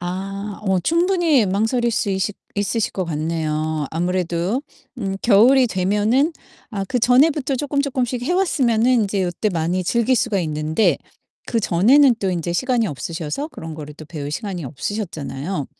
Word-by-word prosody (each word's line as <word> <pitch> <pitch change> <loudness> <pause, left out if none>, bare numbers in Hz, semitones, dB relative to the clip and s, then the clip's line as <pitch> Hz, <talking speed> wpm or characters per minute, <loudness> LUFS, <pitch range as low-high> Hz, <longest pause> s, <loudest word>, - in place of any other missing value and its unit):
아 195 +3 -5
어 190 -1 +3
충분히 335 - +2
망설일 225 +5 +1
수 210 -2 0
있시 190 +2 -1 0.2
있으실 205 +2 0
것 190 - -2
같네요. 155 -1 -2
아무래도 175 - -1 0.4
음 195 -4 -2
겨울이 245 +4 +6
되면은 210 - +1 0.4
아 200 -4 -3
그전에부터 260 +5 +3
쪼끔 285 +1 -1
쪼끔씩 255 -3 -2
해 265 - 0
왔으면은 255 - +2
인제 200 -1 -1
요때 180 +4 -1
많이 175 +1 -1
즐길 235 +6 +2
수가 230 -4 +1
있는데 155 +4 +1 0.5
그전에는 235 +6 +4
또 195 - 0
인제 175 -1 -2
시간이 240 +4 +1
없으셔서 165 - -4
그런 160 - -8
거를 150 -1 -8
또 155 - -11
배울 150 -2 -6
시간이 185 0 -4
없으셨잖아요. 155 - -4
200 Hz, 335 characters per minute, -21 LUFS, 170-245 Hz, 0.5 s, 겨울이